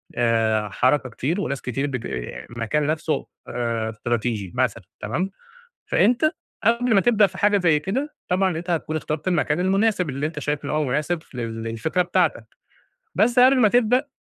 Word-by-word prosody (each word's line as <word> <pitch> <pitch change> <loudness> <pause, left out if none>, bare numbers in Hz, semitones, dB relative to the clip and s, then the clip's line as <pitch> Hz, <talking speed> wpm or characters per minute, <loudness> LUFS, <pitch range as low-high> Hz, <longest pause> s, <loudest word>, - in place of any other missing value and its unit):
آآ 110 -3 +1
حركة 130 +5 +1
كتير 155 - -2
وناس 140 -8 -3
كتير 135 +3 -2
بت 130 -4 -3
المكان 120 - -3
نَفْسه 155 0 -1 0.2
آآ 115 -2 -2
استراتيجي 110 -3 -2
مثلًا 120 -4 0 0.2
تمام، 155 - -2 0.6
فأنت 245 +7 +3 0.4
قبل 235 +1 +3
ما 195 - +6
تبدأ 215 -2 +4
في 185 -1 -11
حاجة 205 0 +3
زي 165 -5 +3
كده، 260 - -3
طبعًا 185 -2 +1
أنت 175 +2 -6
هتكون 160 -2 -1
اخترت 155 +1 -3
المكان 165 -2 +1
المناسب 190 -2 +1
اللي 140 +3 -2
أنت 155 -1 -6
شايف 150 0 -2
إن - - -3
هو 155 0 +1
مناسب 150 +5 -1
ف - - -24
للفكرة 115 +7 -2
بتاعتك، - - 0 0.7
بس 240 +3 +3
قبل 260 +1 +6
ما 225 - +6
تبدأ 245 +4 +3
155 Hz, 165 wpm, -23 LUFS, 120-195 Hz, 0.7 s, ما